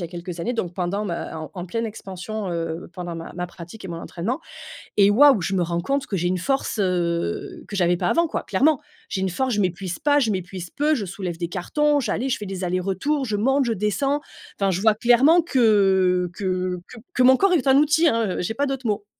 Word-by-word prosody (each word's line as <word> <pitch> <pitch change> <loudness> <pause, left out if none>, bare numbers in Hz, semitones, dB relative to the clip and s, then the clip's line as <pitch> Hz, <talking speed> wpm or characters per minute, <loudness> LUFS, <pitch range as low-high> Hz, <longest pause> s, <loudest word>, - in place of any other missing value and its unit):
y 175 - -3
a - - -6
quelques 175 0 -7
années 240 +7 -1
donc 180 -7 -3
pendant 195 +3 -2
ma 170 -3 -4
en 155 - -7
en 180 -1 -5
pleine 230 +5 -2
expansion, 200 -1 -6
heu, 165 -1 -4
pendant 175 -1 -6
ma 165 0 -7
ma 180 0 -3
pratique 175 +4 -11
et - - -6
mon 165 -1 -5
entraînement 220 - -4 0.6
et 200 0 +6
waouh! 265 -1 +6
Je 195 +3 -1
me 180 - +2
rends 170 0 -1
compte 275 +5 -1
que 195 - -2
j'ai 175 +1 0
une 185 0 0
force, 270 +1 -1
heu, 170 - -1
que 200 - -5
j'avais 175 -1 +3
pas - - 0
avant 335 0 +3
quoi, - - -3
clairement. 275 +8 +2 0.3
J'ai 190 - -2
une 190 - 0
force, 260 +7 -1
je 205 - +1
m'épuise 185 0 -2
pas, 290 0 +3
je 225 -4 +1
m'épuise 185 -2 -4
peu, 300 +2 +1
je 220 -7 -2
soulève 180 -2 -5
des 170 -1 -3
cartons, 290 - +1
j'allais 250 +2 -1
je - - 0
fais 210 - -6
des 190 -1 -4
allers-retours, 195 - -1
je 210 -2 -1
monte, 270 +4 +2
je 230 - +1
descends, 275 +9 0 0.4
enfin, 195 -1 +2
je 185 +1 -1
vois 220 0 +4
clairement 255 +9 +5
que 195 - +3
que 185 -1 -2
que 250 - -12 0.2
que 255 - +2
mon 260 +1 +7
corps 390 +3 +3
est 290 -6 +2
un 265 0 +6
outil, 310 +3 +4
hein, 225 -6 0
heu, - - -1
j'ai 220 +5 -2
pas 285 +4 0
d'autres 270 -3 -3
mots. 210 -1 -1
200 Hz, 240 wpm, -23 LUFS, 180-260 Hz, 0.6 s, mon